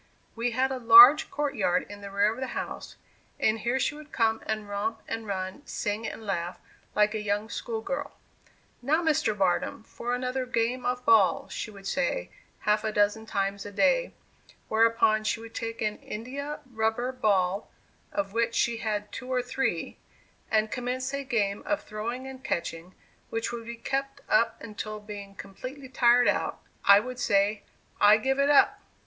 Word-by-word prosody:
We 230 +1 0
had 260 +3 0
a 260 - -3
large 315 - +9
court 295 -1 -2
yard 185 -5 +1
in 205 0 -10
the 200 - -7
rear 200 +2 +2
of 240 - -10
the 260 - -4
house, - - -6 0.4
and 220 +1 +2
here 240 +4 0
she 280 - +1
would 300 0 -12
come 225 -2 +1
and 215 -1 -2
romp 210 +3 -2
and 225 -1 -4
run, 190 +4 -4
sing 210 +1 -2
and 220 - -7
laugh, 175 -3 -2 0.4
like 210 0 +3
a 215 - -2
young 210 +1 -1
school 225 -2 -4
girl. 280 +4 -4 0.6
"Now, 310 +7 +1
Mr. 300 -9 +1
Barnum, 190 +3 0
for 240 +2 -4
another 255 +1 -2
game 245 +1 0
of 250 0 -2
ball," 220 -4 +4
she - - -5
would 200 -2 -13
say - - -1 0.3
half 210 0 +2
a 220 - -1
dozen 210 +2 +1
times 195 -1 -1
a 205 - -8
day; - - +2 0.5
whereupon, 220 -1 +3
she 215 - 0
would 230 0 -11
take 230 0 -4
an 210 -1 -1
india 280 +7 -6
rubber 225 +3 0
ball, 200 -5 +1 0.4
(of 195 0 -2
which 230 0 0
she 235 -1 +1
had 210 -2 -3
two 255 0 -7
or 250 -1 +1
three,) 245 -9 -2 0.5
and 215 0 +2
commence 255 +2 -3
a 280 0 -2
game 210 -6 0
of 305 - 0
throwing 235 +4 -5
and 265 -1 -9
catching, 170 +1 -4 0.3
which 225 0 -2
would 230 -1 -6
be 235 - -5
kept 275 +3 -3
up 230 0 +2
until, 215 -1 -6
being 205 -1 -9
completely 255 +9 -8
tired 245 -1 +4
out, - - 0 0.2
I 200 0 +8
would 250 +3 -6
say, 200 -1 +2 0.4
"I 210 +1 +7
give 265 +4 0
it 280 +1 +3
up." 290 - +5
225 Hz, 180 wpm, -28 LUFS, 210-255 Hz, 0.6 s, large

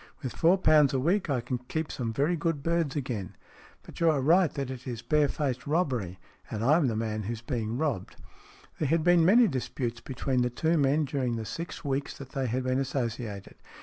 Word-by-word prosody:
With 130 - -3
four 175 +3 +4
pounds 155 -6 +4
a - - +2
week 175 +6 +1
I 130 -4 +1
can 125 +1 -3
keep 150 +5 -4
some 115 -3 -3
very 145 +9 +1
good 165 -3 -2
birds 165 -4 0
again. 120 - -4 0.5
But - - -12
you 170 - +4
are 150 -3 +2
right 165 +4 +4
that 135 -3 -3
it 130 0 -8
is 120 -2 -5
bare 150 -1 +3
faced 135 -3 -3
robbery, 130 - 0 0.3
and 110 - -3
I 145 +6 +5
am 160 -6 +2
the 115 - -1
man 110 -1 -2
who 110 +3 -3
is 115 0 -8
being 115 -5 -2
robbed." 135 - -2 0.6
There 155 - +1
had 165 0 +2
been 175 -1 +5
many 225 +7 +6
disputes 120 - -3
between 130 -1 -1
the 125 - +1
two 160 +7 0
men 145 0 +2
during 130 -4 -1
the 110 -1 -4
six 165 - -6
weeks 140 0 -2
that 135 -2 -9
they 135 -1 -2
had 125 +3 -1
been 130 +1 0
associated. 115 -6 -4
135 Hz, 215 wpm, -28 LUFS, 120-155 Hz, 0.6 s, many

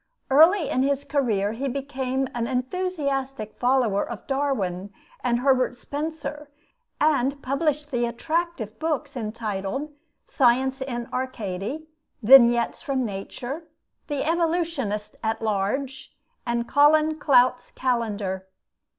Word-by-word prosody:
Early 320 +4 +6
in 255 - +1
his 280 +1 +1
career 220 -10 0
he 255 +5 -3
became 265 -1 -2
an 235 -1 -2
enthusiastic 270 - -2
follower 245 -5 +2
of 235 -5 -7
Darwin 205 -10 -1 0.3
and 240 -1 +1
Herbert 255 -2 +2
Spencer, 295 +1 -5 0.5
and 280 -2 +2
published 295 +2 -1
the 240 -2 +1
attractive 310 - -3
books 300 -3 -2
entitled 220 +4 -3 0.3
'Science 265 +1 +2
in 240 -3 -4
Arcady,' 255 +2 -4 0.4
'Vignettes 240 0 +6
from 270 -5 -1
Nature,' 245 - -6 0.4
'The 290 -3 -2
Evolutionist 325 - -1
at 220 0 -1
Large,' 225 +6 -2 0.4
and 235 0 -1
'Colin 305 +3 +4
Clout's 255 -3 +3
Calendar.' 210 -7 -2
265 Hz, 105 wpm, -25 LUFS, 235-290 Hz, 0.5 s, Early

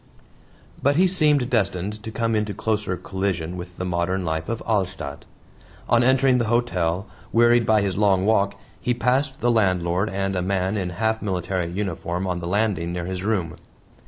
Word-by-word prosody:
But 140 +1 +3
he 180 +4 +5
seemed 150 -8 +3
destined 105 -2 0
to 110 - -6
come 115 0 -1
into 105 -2 -1
closer 105 -3 -1
collision 90 -2 -3
with 90 0 -8
the 90 - -3
modern 90 +1 -1
life 80 0 -2
of 115 0 -3
Alstadt. 90 -9 -2 0.6
On 120 0 +4
entering 130 0 +4
the 120 - +1
hotel, 95 -6 0 0.3
wearied 120 0 +4
by 110 -2 +4
his 95 -2 -1
long 100 -2 +3
walk, 100 -2 +2 0.2
he 125 -1 0
passed 130 +3 0
the 120 +1 +3
landlord 95 -3 +1
and 95 0 -2
a 90 - 0
man 95 +1 0
in 95 -4 -2
half 110 +5 -1
military 95 -3 -2
uniform 90 -1 -3
on 90 -2 -2
the 85 - -5
landing 95 -3 0
near 90 -1 -3
his 90 0 -4
room. 95 -5 -1
100 Hz, 175 wpm, -23 LUFS, 90-115 Hz, 0.6 s, he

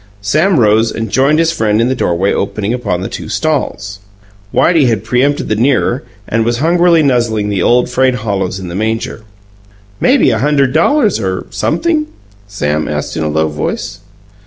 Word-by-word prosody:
Sam 155 - +2
rose 110 0 +3
and 115 -2 -5
joined 140 +3 +3
his 165 0 +2
friend 110 -8 0
in 115 - +2
the 130 - +1
doorway 95 -5 0
opening 105 +2 -2
upon 120 -8 -2
the 95 - -3
two - - -7
stalls. 130 -9 -2 0.5
Whitey 165 -6 +3
had 110 -4 0
preempted 125 +5 0
the 110 - 0
nearer, 125 +2 +1 0.3
and 115 0 0
was 120 +1 0
hungrily 170 +2 +3
nuzzling 115 -6 +1
the 100 -2 -1
old 125 +1 +3
frayed 130 +1 +1
hollows 100 -5 -2
in 95 - -7
the 85 - -7
manger. 110 +3 -3 0.8
"Maybe 260 - +3
a 115 - 0
hunderd 140 -2 +1
dollars 210 - +2
or 95 -3 -3
sumpthing?" 320 -3 0 0.4
Sam 75 -6 -2
asked 75 -1 -4
in - - -2
a 80 - -1
low 80 +1 +1
voice. 75 +5 -4
115 Hz, 175 wpm, -13 LUFS, 100-145 Hz, 0.8 s, rose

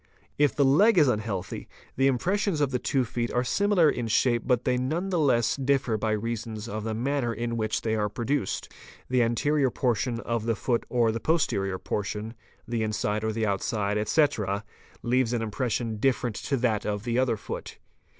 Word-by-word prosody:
If 145 -1 +3
the 140 - +3
leg 190 +11 +5
is 150 -4 +6
unhealthy, 105 -6 -2 0.3
the 135 +1 +3
impressions 180 - +1
of 145 -2 +1
the 125 - 0
two 130 0 0
feet 120 0 -3
are 125 - +1
similar 200 +5 +3
in 120 -5 0
shape 120 +2 +2
but 125 -2 +2
they 125 - +2
none 155 +10 -1
the 180 -3 0
less 120 -6 +3
differ 135 -3 +1
by 110 0 0
reason 115 0 -3
of 110 -1 -4
the 110 0 -2
manner 130 +1 0
in 115 +1 -3
which 110 -1 -1
they 110 - 0
are 105 -1 0
produced; 120 +1 -2 0.4
the 125 -1 +3
anterior 135 +4 +2
portion 120 -1 0
of 115 -1 -2
the 115 - +2
foot 120 +2 -1
or 120 -2 +2
the 115 - -3
posterior 105 - 0
portion, 105 +3 -4 0.3
the 115 -1 -1
inside 110 0 -1
or 110 - 0
the 110 0 -1
outside, 100 0 -1
etc., 105 -3 +1 0.4
leaves 125 0 +1
an 115 -2 0
impression 115 0 -2
different 120 -1 0
to 140 - -1
that 115 -4 +1
of 105 -1 -2
the 120 +1 0
other 130 -3 +1
foot. - - -7
120 Hz, 190 wpm, -27 LUFS, 110-135 Hz, 0.4 s, is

